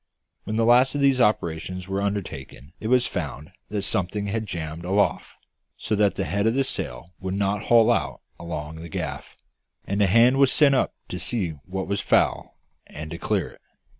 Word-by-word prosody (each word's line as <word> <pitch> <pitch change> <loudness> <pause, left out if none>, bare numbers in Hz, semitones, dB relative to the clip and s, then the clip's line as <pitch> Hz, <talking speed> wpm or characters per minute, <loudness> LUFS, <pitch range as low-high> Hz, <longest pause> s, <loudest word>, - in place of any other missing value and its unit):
When 110 - -3
the 115 0 +2
last 125 +4 +5
of 145 - 0
these 135 -2 +4
operations 90 -3 0
were 95 +1 -2
undertaken 80 -8 -5
it 110 - -4
was 125 +1 +4
found 75 -2 -5 0.2
that 105 -1 -2
something 100 +2 -1
had 110 +2 -2
jammed 80 -2 -5
aloft, 100 +3 0 0.4
so - - -3
that 105 -1 +2
the 95 - -1
head 100 +2 0
of 115 - +2
the 135 - +3
sail 85 - -4
would 95 +1 -3
not 100 +1 -1
haul 115 -2 +5
out - - -1 0.2
along 80 -2 -6
the 85 +1 -9
gaff; - - -5 0.5
and 100 +1 -1
a 100 - +5
hand 115 +7 +5
was 135 -1 +5
sent 145 -3 +5
up 130 - +1
to 90 - -4
see 95 0 -1 0.2
what 95 0 -3
was 100 0 -1
foul, - - +1 0.3
and 75 +1 -8
to 85 - -6
clear - - 0
it. - - -20
100 Hz, 195 wpm, -24 LUFS, 85-115 Hz, 0.5 s, last